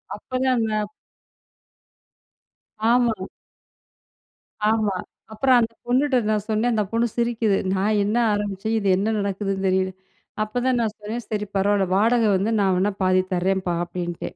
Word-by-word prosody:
அப்ப - - -17
தான் 260 - +3
அந்த 220 -1 0 2.2
ஆமா. 240 -2 +3 1.6
ஆமா. 215 -4 +1 0.4
அப்புறம் 255 +3 +4
அந்த 230 0 -1
பொண்ணுட்ட 260 +2 +2
நான் 210 -1 -1
சொன்னேன். 220 +3 +1
அந்த 215 -1 +1
பொண்ணு 230 +1 +1
சிரிக்குது. 230 -4 +1 0.2
"நான் 205 +2 +1
என்ன 210 +4 0 0.2
ஆரம்பிச்சேன் 205 +2 -2
இது 200 - -2
என்ன 215 +3 0
நடக்குதுன்னு 195 -1 -2
தெரியல" 185 0 +1 0.5
அப்தான் 245 +3 0
நான் 215 -2 -1
சொன்னேன், 220 +3 -5
"சரி 210 -1 -2
பரவால்ல 200 0 +2
வாடக 230 +3 +3
வந்து 200 +4 0
நான் 190 -2 +3
வேணா 200 +3 +1
பாதி 185 0 +4
தரேன்பா" 185 0 0
அப்டின்ட்டேன். 175 -1 -5
210 Hz, 135 wpm, -23 LUFS, 195-230 Hz, 2.2 s, அப்புறம்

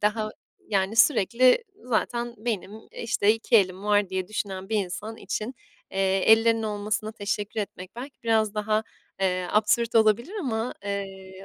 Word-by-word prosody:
daha 215 +1 0 0.4
yani 200 +1 0
sürekli 250 - +5 0.2
zaten 240 0 -1
benim, 210 -4 -3 0.2
işte, 220 -2 +2
"2 225 +1 +2
elim 190 -1 +1
var." 205 -1 +3
diye 185 0 -3
düşünen 195 -3 -4
bir 220 - 0
insan 210 +5 -6
için, 225 +4 -4 0.4
eee, 195 0 +1
ellerinin 225 0 +4
olmasına 215 +1 -2
teşekkür 205 0 -3
etmek 185 -2 -7
belki 260 +2 -9
biraz 220 -2 +2
daha, 215 +1 +1 0.4
eee, 185 -1 +1
absürt 220 +2 +2
olabilir 225 - +3
ama, 240 -5 -2
eee, 195 -1 -6
215 Hz, 140 wpm, -26 LUFS, 195-225 Hz, 0.4 s, sürekli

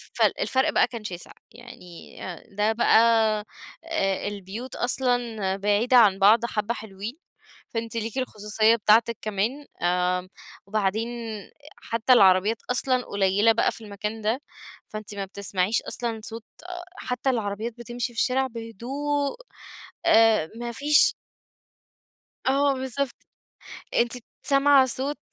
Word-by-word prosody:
فال - - +2
الفرق 265 0 +1
بقى - - +3
كان 230 -3 -8
شاسع، 180 -4 -7 0.2
يعني 175 -2 -13 0.2
آآ، 170 - -13
ده 210 +1 +2
بقى 235 - +4 0.9
آآ، 195 - -1
البيوت 205 +5 -7
أصلًا 240 -6 0
بعيدة 210 +5 +3
عن 205 -5 +5
بعض 220 +4 +5
حبّة 215 0 -2
حلوين، 215 +4 -8 0.5
فأنتِ 230 0 -4
ليكِ 225 +2 -4
الخصوصية 215 -2 +2
بتاعتِك 225 +1 +3
كمان 215 +8 -2 0.2
آآ، 180 +1 +1 0.4
وبعدين 215 +3 -1 0.7
حتى 230 +3 +2
العربيات 195 0 +5
أصلًا 255 0 +1
قليلة 200 +3 +3
بقى، 225 - +2
في 230 - -11
المكان 210 +2 -5
ده، 225 +6 0 0.5
فأنتِ 215 -1 -7
ما 195 - -3
بتسمعيش 195 +1 -1
أصلًا 230 -2 -3
صوت 225 0 -7 0.2
أ 355 0 -7
حتى 250 -2 -2
العربيات 220 -1 -2
بتمشي 240 +1 -4
في 230 - -4
الشارع 265 +1 +2
بهدوء 265 +5 -3 0.7
آآ، 220 -8 +5
ما 235 0 -5
فيش 290 +5 +4 1.3
آه 275 +1 +3
بالضبط، 265 +1 -3 0.8
أنتِ 235 0 +2 0.3
سامعة 275 -1 +5
صوت 270 +4 -1
225 Hz, 125 wpm, -25 LUFS, 205-250 Hz, 1.3 s, عن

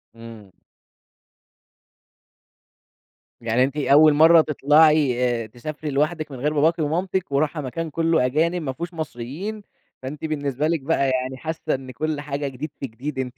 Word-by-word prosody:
امم. 115 -4 -12 2.9
يعني 115 +2 +2
أنتِ 135 +3 -2
أول 150 +2 +5
مرَّة 160 +2 +7
تطلَعي 150 -3 +3 0.2
آآ - - -8
تسافري 150 +7 -7
لوحدِك 155 +2 -1
من 130 - -8
غير 150 +4 0
باباكِ 160 +3 +2
ومامتِك 175 +3 -1
وراحة 150 +2 0
مكان 160 +5 -4
كلّه 165 -2 +1
أجانب 165 +7 0
ما 135 -4 -3
فيهوش 170 +6 -6
مصريين، 160 - -6 0.4
فأنتِ 140 +4 -6
بالنسبة 145 -2 -2
لِك 165 -2 0
بقى 140 -1 +1
يعني 130 0 -2
حاسّة 160 +1 -3
إن 130 -1 -8
كل 155 +3 -3
حاجة 145 -1 -4
جديد 135 +3 -6
في 135 - -4
جديد 130 +4 -6
أنتِ 125 -1 -4
150 Hz, 150 wpm, -23 LUFS, 130-160 Hz, 2.9 s, مرَّة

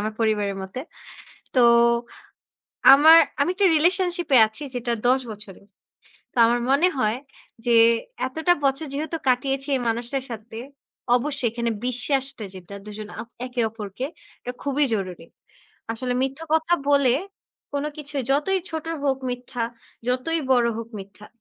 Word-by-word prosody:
আমার 215 +1 -2
পরিবারের 210 -3 +1
মতে। 190 +7 -6 0.8
তো 255 - +5 1.3
আমার 315 +4 +9 0.2
আমি 280 - +3
একটা 390 +1 +3
রিলেশনশিপে 350 -3 +2
আছি 220 +7 -10
যেটা 240 -1 -2 0.2
১০ 260 +1 +4
বছরের। 205 -2 -11 0.7
তা - - -38
আমার 240 +1 +2
মনে 290 +7 +4
হয় 215 +1 +1 0.5
যে 235 - +3 0.5
এতটা 320 +7 +1
বছর 275 +3 +1
যেহেতু 310 +4 -3
কাটিয়েছি 270 +2 0
এই - - -2
মানুষটার 240 +4 -2
সাথে, 225 0 -8 0.6
অবশ্যই 270 -1 -1
এখানে 235 +1 -2 0.2
বিশ্বাসটা 265 -1 -1
যেটা 185 +1 -10
দুজন 210 0 -8
আপ 235 - -9 0.2
একে 250 -1 -3
অপরকে 215 +3 -6 0.3
এটা 245 - -5
খুবই 285 +1 +1
জরুরী। 185 -5 -5 0.7
আসলে 250 +2 -3
মিথ্যা 270 +4 -3
কথা 320 +2 +3 0.2
বলে, 280 -4 +4 0.6
কোন 285 0 -2
কিছুই 285 -2 -4
যতই 340 +8 +1
ছোট 320 -1 -4 0.2
হোক 270 -2 +1
মিথ্যা, 245 -1 -5 0.5
যতই 255 +7 0
বড় 245 -2 +4
হোক 230 0 -6
মিথ্যা। 200 +2 -13
255 Hz, 135 wpm, -24 LUFS, 225-285 Hz, 1.3 s, আমার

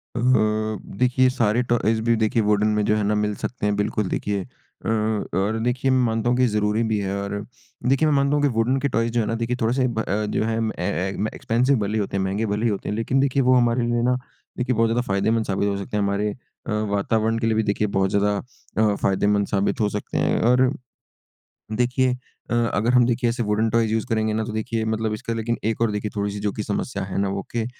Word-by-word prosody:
अ, - - -1 0.8
देखिए 125 +1 +3
सारे 120 -2 +1
टॉयज़ 110 -1 +2
भी 115 0 +3
देखिए 110 +1 +1
वुडन 105 0 +2
में 105 - +2
जो 105 - +2
है 105 - 0
ना 105 +1 +1
मिल 105 0 0
सकते 125 0 -4
हैं। 105 0 +1
बिल्कुल 105 0 -1
देखिए 100 -1 -1 0.4
अ, - - -1
और 110 -1 0
देखिए 125 +2 +1
मैं 130 - +3
मानता 115 +1 0
हूँ 125 - +2
कि 125 - +4
ज़रूरी 105 +1 +1
भी 110 -1 +1
है 100 -1 -2
और 100 - -4 0.6
देखिए 135 +4 +3
मैं 150 - +3
मानता 140 +1 +2
हूँ 145 - +1
कि - - +5
वुडन 120 +4 +2
के 140 - 0
टॉयज़ 115 -1 0
जो 120 - +2
है - - -1
ना 115 - -1
देखिए 115 +1 -1
थोड़े 115 +1 +2
से 130 -1 +2
ब 115 -3 -3
अ, 105 0 -1
जो 105 - -1
हैं 110 0 -1 0.2
ए 90 - -1
ए 95 +5 -2
एक्सपेंसिव 125 +4 +1
भले 105 0 -2
ही 110 - +1
होते 100 -1 -2
हैं, 95 - 0
महँगे 100 +4 -1
भले 105 +2 -1
ही - - +3
होते 100 - -4
हैं। 105 - -1
लेकिन 115 +4 0
देखिए 135 0 +2
वो 130 +1 +4
हमारे 120 0 +3
लिए 120 0 +1
ना 125 +1 +3 0.4
देखिए 125 0 0
बहुत 115 +1 +3
ज़्यादा 120 +2 +1
फायदेमंद 110 +3 +1
साबित 100 +1 0
हो 100 - -1
सकते 100 +2 -4
हैं। - - +1
हमारे 100 +1 0 0.4
अ, - - -2 0.2
वातावरण 110 +2 +1
के 115 - 0
लिए 110 - +2
भी 110 - +2
देखिए 105 0 0
बहुत 95 0 +2
ज़्यादा 100 +1 +1 0.4
अ, 105 -1 +3
फायदेमंद 100 +1 +1
साबित 100 0 0
हो 105 - +2
सकते 105 0 -4
हैं। - - +1
और 125 +2 +4 1.0
देखिए 125 +3 +1 0.4
अ, - - +1 0.2
अगर 115 +4 +1
हम 125 -1 +6
देखिए 120 0 +1
ऐसे 120 0 -1
वुडन 110 +1 +1
टॉयज़ 115 -1 +1
यूज़ 110 -1 0
करेंगे 110 -1 +1
ना 110 +1 0
तो 110 - -5
देखिए 110 0 -2
मतलब 110 0 -1
इसका 110 +2 -4
लेकिन 115 +1 -2
एक 110 +1 -1
और 115 -2 +2
देखिए 105 0 -3
थोड़ी-सी 100 0 -2
जो 105 0 -1
कि 105 - -4
समस्या 105 +5 -3
है 95 0 -5
ना 100 - 0
वो 100 0 -2
के 115 -1 0
110 Hz, 245 wpm, -23 LUFS, 105-120 Hz, 1.0 s, हम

